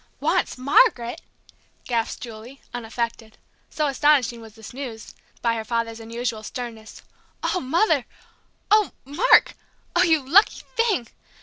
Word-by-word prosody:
"Wants - - 0
Margaret!" 260 - +3 0.6
gasped 230 -2 -2
Julie, 235 +3 -10
unaffected 230 -1 -4 0.3
so 305 - -1
astonishing 275 -4 +2
was 220 -1 -13
the 220 -2 -11
news 245 -5 -7 0.3
by 235 -1 +2
her 225 -1 -3
father's 230 0 -2
unusual 230 0 -4
sternness. 225 -1 -8 0.4
"Oh, 370 - 0
Mother! 315 - +2 0.7
Oh, 425 -1 +4
Mark! 320 - +4 0.4
Oh, 350 - +5
you 320 -6 +3
lucky 385 +9 +4
thing! 435 - +1
245 Hz, 120 wpm, -23 LUFS, 230-300 Hz, 0.7 s, Oh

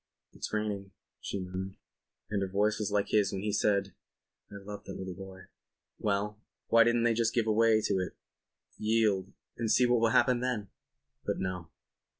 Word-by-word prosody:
"It's - - -6
raining," 105 -2 -2 0.3
she 100 - -4
murmured. 95 +1 -5 0.6
And 100 -1 0
her 95 - 0
voice 105 +3 +1
was 105 -1 -1
like 100 -1 +1
his 105 -2 +3
when 95 - -3
he 105 - -1
had 105 - 0
said: 100 -2 +1 0.6
"I - - -9
love 100 0 -8
that 95 - -7
little 95 -1 -5
boy." 95 0 -10 0.6
Well. 105 +1 -1 0.3
Why 115 0 +7
didn't 120 0 +2
they 120 -1 +4
just 115 0 +1
give 115 -2 +3
way 110 0 +4
to 95 - +1
it—yield—and 105 +3 -3
see 125 - +5
what 120 -1 +3
will 115 0 +4
happen 125 +1 +4
then? 120 -6 -2 0.5
But - - -1
no. 90 -2 -4
105 Hz, 170 wpm, -31 LUFS, 95-115 Hz, 0.6 s, Why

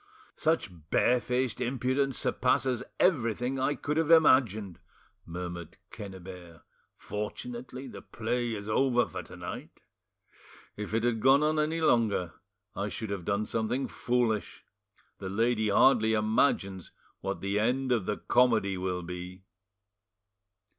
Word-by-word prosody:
"Such 155 - +1 0.2
barefaced 125 +2 +1
impudence 130 +2 0
surpasses 125 0 +1 0.2
everything 125 - +1
I 145 +2 +1
could 150 +1 -3
have 165 -1 +1
imagined!" 115 - +4 0.5
murmured 85 -1 -6
Quennebert: 95 -4 -10 0.3
"fortunately, 125 +5 -6
the - - -9
play 120 +1 -2
is 100 0 -7
over 125 +2 +3
for 90 - -6
to 90 - -12
night; 85 0 -8 1.0
if 105 +1 -4
it 115 - +1
had 120 -2 +1
gone 135 +5 +5
on 155 0 +2
any 160 +2 0
longer, 110 - +2 0.4
I 100 +2 -2
should 110 0 -5
have 95 -4 -4
done 100 +2 0
something 115 +5 -1
foolish. 120 -4 -1 0.5
The 95 - -5
lady 110 +1 +1
hardly 110 +1 +5
imagines 105 -4 +1 0.3
what - - -3
the 100 +1 0
end 130 +4 +1
of 115 -6 +1
the 105 - -1
comedy 115 -6 +2
will 90 -1 -2
be." 90 +2 -7
115 Hz, 125 wpm, -29 LUFS, 100-130 Hz, 1.0 s, gone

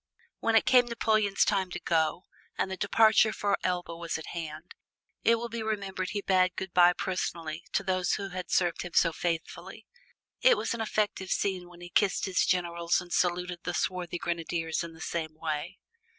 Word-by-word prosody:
When 230 0 +1
it 225 - +5
came 250 -2 +5
Napoleon's 215 -3 +2
turn 195 -3 +1
to - - -5
go 160 +1 0 0.3
and 190 - -1
the - - -2
departure 220 +2 +4
for 205 -1 0
Elba 175 -2 -2
was 170 -1 -3
at 160 - -8
hand, 160 0 -7 0.5
it 230 - +5
will 235 +1 -4
be 235 0 -5
remembered 200 -4 -3
he 205 -1 -3
bade 185 -1 +3
good 190 -2 -5
by 175 0 +6
personally 170 -3 -3
to 200 - +1
those 185 -2 0
who 195 -1 -2
had 180 -1 -6
served 175 -3 +1
him 180 -2 -7
so 165 -2 +4
faithfully. 165 0 -4 0.6
It - - +6
was - - -1
an 235 - -4
affecting 210 -3 -1
scene 185 -2 -1
when 175 0 -15
he 175 - -9
kissed 195 +1 +2
his 190 -2 +1
generals 170 -1 +1
and 180 -1 -7
saluted 180 0 0
the 175 0 -3
swarthy 180 -2 -2
grenadiers 165 -1 -2
in 170 -1 -8
the 160 - -14
same 160 -2 -3
way. 155 +4 -4
180 Hz, 190 wpm, -29 LUFS, 170-200 Hz, 0.6 s, by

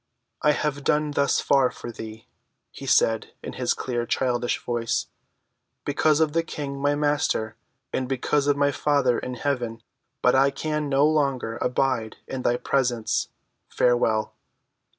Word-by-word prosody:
"I 150 - +4
have 145 -1 -2
done 150 +1 +1
thus 140 -1 +2
far 135 -2 +3
for 120 - -8
thee," 110 -1 -9 0.5
he - - -9
said 115 -1 +2
in - - -6
his - - 0
clear 120 -2 -3
childish 120 -2 0
voice, 120 -1 -1 0.8
"because 150 +1 +2
of 155 -2 +2
the 165 - +3
King, 140 -4 -5
my 145 +1 +2
Master, 145 -7 0 0.4
and 130 -1 -1
because 140 +2 +1
of 145 -1 +3
my 145 0 +3
Father 140 -3 +2
in 125 - -5
heaven. 120 -4 -2 0.4
But 125 - +5
I 135 +1 +5
can 150 +1 -2
no 140 +1 +4
longer 140 -7 +1
abide 125 -3 0
in 130 - -4
thy 120 -1 +1
presence. 125 -5 0 0.4
Farewell!" 115 -3 +2
135 Hz, 150 wpm, -25 LUFS, 120-145 Hz, 0.8 s, But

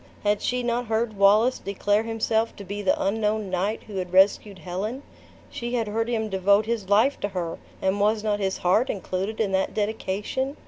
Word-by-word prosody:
Had 205 0 +1
she 250 0 -1
not 240 0 -1
heard 220 0 0
Wallace 210 +5 +4
declare 205 +1 0
himself 225 0 -1
to 200 - -9
be 200 +1 -5
the 195 - +1
unknown 210 -1 0
knight 195 +4 -1
who 205 -3 -8
had 180 -1 -3
rescued 195 +1 +3
Helen? 195 - -4 0.5
She 240 +1 -4
had 230 -3 0
heard 225 +2 -1
him 220 -2 -1
devote 200 +1 +3
his 220 -4 -3
life 225 +8 +3
to - - -1
her, 180 -4 -4 0.2
and 190 +2 +1
was 210 +1 +2
not 210 -1 0
his 190 -1 -1
heart 200 +9 +2
included 195 +2 -3
in 210 -3 +1
that 190 0 0
dedication? 220 +6 -2
210 Hz, 190 wpm, -25 LUFS, 195-225 Hz, 0.5 s, Wallace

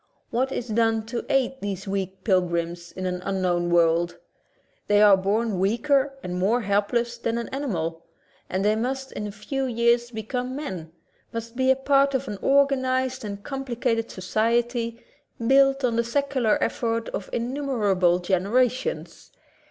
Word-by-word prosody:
What 260 +3 0
is 245 - -3
done 225 0 +1
to 235 +1 -5
aid 265 0 +1
these 195 -1 -4
weak 195 -1 -3
pilgrims 170 -3 0
in 185 - -6
an 180 0 -2
unknown 180 -3 0
world? 170 0 +2 0.7
They 205 0 +4
are 205 -1 +8
born 200 +1 0
weaker 275 +7 +2
and 180 0 -3
more 220 +7 +2
helpless 235 +4 0
than 230 0 -1
an 235 - -4
ani 280 +2 -3
mal, 165 -5 -2 0.5
and 190 +2 -1
they 210 +1 +3
must 265 +4 -3
in 210 - -4
a - - -6
few 265 +7 -3
years 235 0 +2
become 245 +3 -4
men; 185 - -6 0.4
must 230 +1 -6
be 260 +1 +2
a 265 - +6
part 275 +1 +3
of 265 +1 -1
an 205 -2 -5
organized 260 -2 +2
and 200 -1 -6
com 270 +2 -4
plicated 235 -2 -1
society, 230 +4 -1 0.4
built 270 +1 +4
on 235 -2 +1
the 235 - +3
secular 260 -2 +1
effort 230 -1 -1
of 190 - -5
innumerable 230 -9 +1
generations. 225 - 0
230 Hz, 155 wpm, -25 LUFS, 195-260 Hz, 0.7 s, are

